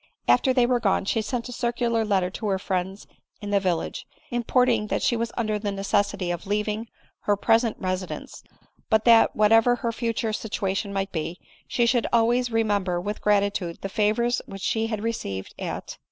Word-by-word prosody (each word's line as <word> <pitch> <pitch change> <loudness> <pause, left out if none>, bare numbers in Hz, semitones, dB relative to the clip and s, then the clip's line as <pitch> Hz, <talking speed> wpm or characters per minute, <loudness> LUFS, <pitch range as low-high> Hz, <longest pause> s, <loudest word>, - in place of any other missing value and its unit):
After 120 - +4
they 250 -1 +4
were 245 0 +2
gone 195 -3 +1
she 225 +3 +1
sent 235 +3 -3
a - - -7
circular 235 -2 0
letter 190 -4 +1
to 215 - -4
her 195 -1 +1
friends 190 +1 -3 0.3
in 205 -1 -6
the 200 - +4
village, 180 -4 -2 0.2
importing 240 -2 +2
that - - -1
she 240 - +2
was 230 0 -2
under 215 -3 0
the 205 -1 -2
necessity 200 -2 0
of 175 +3 -5
leaving 210 +2 -1 0.4
her 205 -1 +2
present 225 +2 +2
resi^ 185 0 -2
dence; - - -8 0.5
but 220 -1 +3
that, 230 -1 +6
whatever 225 +3 +5
her 235 -1 -2
future 230 -1 -2
situation 200 -2 -2
might 195 0 -2
be, 165 +2 -4 0.3
she 240 - +1
should 235 0 +2
always 240 +2 +3
remember, 205 -5 +1
with 205 +4 -4
gratitude, 200 -4 +1
the 195 - -3
favors 220 +4 +1
which 195 -1 -8
she 225 0 0
had 215 -2 -3
received 100 - -4
at - - -5
210 Hz, 180 wpm, -25 LUFS, 195-230 Hz, 0.5 s, that